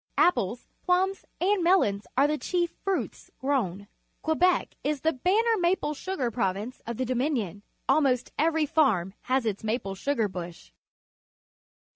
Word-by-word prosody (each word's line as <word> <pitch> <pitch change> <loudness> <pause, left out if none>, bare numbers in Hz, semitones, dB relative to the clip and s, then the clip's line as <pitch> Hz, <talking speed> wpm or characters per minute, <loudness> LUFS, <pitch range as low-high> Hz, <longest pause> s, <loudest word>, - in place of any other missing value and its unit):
Apples, 240 - +2
plums, 375 +2 +1
and 385 0 +2
mel 365 +2 +5
ons 200 0 -3
are 275 - +6
the 300 0 0
chief 350 -2 0
fruits 390 -2 -3
grown. 205 -8 -1 0.4
Quebec 350 +3 +2
is 295 -2 -1
the 320 +1 +2
banner 420 - +2
maple 345 -3 +1
sugar 290 -6 -3
province 210 +2 -2
of 235 -1 -4
the 260 - -1
Dominion. 245 - -1 0.3
Almost 265 -5 +2
every 320 0 +2
farm 245 - +2 0.2
has 260 -1 +2
its 210 -2 -2
maple 215 -3 -2
sugar 225 +2 0
bush. 175 - -8
275 Hz, 140 wpm, -27 LUFS, 215-345 Hz, 0.4 s, are